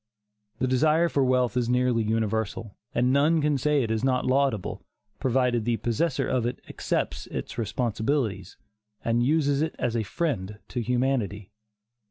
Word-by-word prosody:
The 125 Hz, -, 0 dB
desire 155 Hz, +6 st, +3 dB
for 140 Hz, -3 st, +1 dB
wealth 125 Hz, -1 st, +2 dB
is 120 Hz, -1 st, 0 dB
nearly 125 Hz, -1 st, +2 dB
universal, 110 Hz, -1 st, -1 dB, 0.2 s
and 125 Hz, +2 st, +2 dB
none 150 Hz, +4 st, +4 dB
can 150 Hz, -2 st, +1 dB
say 150 Hz, 0 st, +2 dB
it 110 Hz, -, -2 dB
is 110 Hz, +1 st, -1 dB
not 130 Hz, -1 st, +1 dB
laudable, 130 Hz, -6 st, 0 dB, 0.4 s
provided 125 Hz, -3 st, +1 dB
the 115 Hz, 0 st, 0 dB
possessor 130 Hz, +5 st, 0 dB
of 120 Hz, -2 st, 0 dB
it 125 Hz, -, -4 dB
accepts -, -, -2 dB
its -, -, -5 dB
responsibilities, 110 Hz, -3 st, -1 dB, 0.5 s
and 115 Hz, +1 st, +2 dB
uses 145 Hz, 0 st, +2 dB
it 160 Hz, 0 st, -1 dB
as 120 Hz, -, -1 dB
a 115 Hz, -, +1 dB
friend 105 Hz, -, -2 dB
to 120 Hz, -, -2 dB
humanity. 120 Hz, -5 st, -1 dB
125 Hz, 155 wpm, -26 LUFS, 110-140 Hz, 0.5 s, none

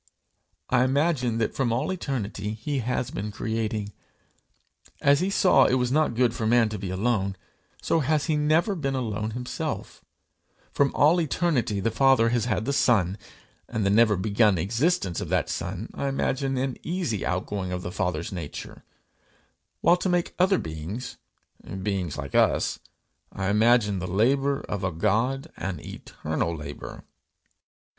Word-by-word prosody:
I 125 Hz, -1 st, +4 dB
imagine 130 Hz, -3 st, +1 dB
that 115 Hz, -2 st, 0 dB
from 130 Hz, -4 st, 0 dB
all 120 Hz, +9 st, 0 dB
eternity 110 Hz, -, -3 dB
he 135 Hz, +6 st, -3 dB
has 125 Hz, 0 st, -2 dB
been 105 Hz, +2 st, -4 dB
creating. 110 Hz, -1 st, -3 dB, 1.1 s
As 140 Hz, 0 st, +4 dB
he 185 Hz, -, 0 dB
saw 180 Hz, -8 st, +5 dB
it 130 Hz, -, +2 dB
was 125 Hz, -1 st, 0 dB
not 150 Hz, -4 st, +2 dB
good 120 Hz, -1 st, +2 dB
for 110 Hz, -2 st, -2 dB
man 115 Hz, -1 st, +4 dB
to 105 Hz, -2 st, -5 dB
be 95 Hz, -1 st, -4 dB
alone, 100 Hz, 0 st, 0 dB, 0.5 s
so 165 Hz, -, +2 dB
has 150 Hz, 0 st, +1 dB
he 155 Hz, -, +1 dB
never 155 Hz, +7 st, +2 dB
been 140 Hz, -7 st, -2 dB
alone 110 Hz, -4 st, -2 dB
himself; 125 Hz, 0 st, -5 dB, 0.7 s
from 140 Hz, -1 st, +2 dB
all 160 Hz, +4 st, +5 dB
eternity 145 Hz, -, 0 dB
the 115 Hz, +4 st, 0 dB
Father 135 Hz, -2 st, +4 dB
has 120 Hz, -2 st, +1 dB
had 110 Hz, -2 st, -1 dB
the 140 Hz, -, 0 dB
Son, 100 Hz, -9 st, +3 dB, 0.5 s
and 110 Hz, -2 st, -1 dB
the 100 Hz, -, +3 dB
never 110 Hz, 0 st, +5 dB
begun 105 Hz, +1 st, +3 dB
existence 115 Hz, -, 0 dB
of -, -, -5 dB
that -, -, +1 dB
Son 90 Hz, +5 st, -4 dB
I 140 Hz, -, -3 dB
imagine 135 Hz, 0 st, -1 dB
an 130 Hz, -1 st, -2 dB
easy 165 Hz, -, -2 dB
outgoing 95 Hz, +1 st, -2 dB
of 90 Hz, 0 st, -3 dB
the 90 Hz, -, -4 dB
Father's 90 Hz, -3 st, -2 dB
nature; 85 Hz, -6 st, -7 dB, 1.0 s
while 175 Hz, -, +5 dB
to 185 Hz, -, -1 dB
make 175 Hz, -1 st, 0 dB
other 190 Hz, +1 st, +4 dB
beings 80 Hz, +10 st, -6 dB, 0.7 s
beings 95 Hz, -6 st, -2 dB
like 70 Hz, -2 st, -6 dB
us, -, -, +2 dB, 0.5 s
I 95 Hz, 0 st, -2 dB
imagine 105 Hz, -2 st, +3 dB
the 90 Hz, -, -4 dB
labour 135 Hz, +9 st, +2 dB
of 105 Hz, -2 st, -5 dB
a 90 Hz, -, 0 dB
God, 125 Hz, -, 0 dB
an 90 Hz, -4 st, -4 dB
eternal 80 Hz, +3 st, -4 dB
labour. 70 Hz, -1 st, -8 dB
115 Hz, 155 wpm, -26 LUFS, 100-135 Hz, 1.1 s, saw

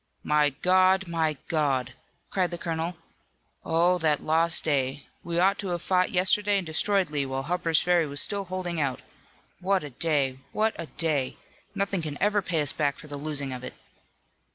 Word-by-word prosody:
"My 150 Hz, -1 st, +3 dB
God! 185 Hz, +6 st, +3 dB
My 160 Hz, -3 st, 0 dB
God!" 140 Hz, -5 st, 0 dB, 0.4 s
cried 185 Hz, -2 st, +1 dB
the 175 Hz, -, -5 dB
colonel. 165 Hz, 0 st, -3 dB, 0.7 s
"Oh, 175 Hz, +2 st, +2 dB
that 155 Hz, -3 st, +2 dB
lost 165 Hz, +1 st, +1 dB
day! 140 Hz, -2 st, 0 dB, 0.2 s
We 170 Hz, 0 st, -3 dB
ought 190 Hz, +3 st, +3 dB
to 200 Hz, -, -4 dB
have 175 Hz, -2 st, -3 dB
fought 185 Hz, -1 st, +2 dB
yesterday 200 Hz, +3 st, +2 dB
and 190 Hz, -, -2 dB
destroyed 180 Hz, +2 st, +1 dB
Lee, 145 Hz, -2 st, 0 dB
while 135 Hz, 0 st, -3 dB
Harper's 165 Hz, 0 st, +1 dB
Ferry 175 Hz, -3 st, +2 dB
was 145 Hz, 0 st, -1 dB
still 200 Hz, -1 st, +2 dB
holding 180 Hz, -3 st, -3 dB
out! 135 Hz, -3 st, -2 dB, 0.6 s
What 190 Hz, 0 st, +1 dB
a 145 Hz, -, -7 dB
day! 135 Hz, -2 st, 0 dB
What 220 Hz, +1 st, +1 dB
a 165 Hz, -, -5 dB
day! 150 Hz, -6 st, -1 dB, 0.4 s
Nothing 200 Hz, -2 st, -1 dB
can 150 Hz, -2 st, -5 dB
ever 205 Hz, +1 st, +2 dB
pay 165 Hz, -5 st, 0 dB
us 145 Hz, -, +2 dB
back 145 Hz, -2 st, 0 dB
for 150 Hz, -, -12 dB
the 145 Hz, -1 st, -5 dB
losing 140 Hz, -2 st, -3 dB
of 125 Hz, 0 st, -7 dB
it!" -, -, -7 dB
165 Hz, 180 wpm, -27 LUFS, 145-185 Hz, 0.7 s, My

